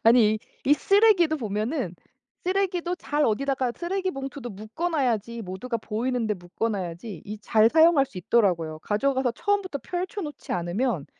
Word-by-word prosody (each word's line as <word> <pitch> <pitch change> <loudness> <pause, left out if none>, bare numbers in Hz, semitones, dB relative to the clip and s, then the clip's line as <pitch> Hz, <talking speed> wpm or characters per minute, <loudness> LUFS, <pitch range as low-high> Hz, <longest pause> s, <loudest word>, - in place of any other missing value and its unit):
아니 225 -2 +6
이 - - -3 0.3
이 290 - +7
쓰레기도 390 -4 +4
보면은 215 - -2 0.5
쓰레기도 365 -2 0
잘 300 -3 0
어디다가 260 +2 0
쓰레기 375 +2 -2
봉투도 270 -3 -6
묶어 220 - -4
놔야지 235 -6 0
모두가 220 +6 -4
보이는데 225 0 -1
묶어 180 +5 -3
놔야지 185 -1 -5
이 210 +1 -6
잘 215 +1 +4
사용할 320 -3 +6
수 190 - -9
있더라고요. 170 -6 +1
가져가서 260 - +1
처음부터 395 - -1
펼쳐 370 +3 -3
놓지 295 -4 -6
않으면 175 - -1
245 Hz, 370 characters per minute, -26 LUFS, 210-315 Hz, 0.5 s, 이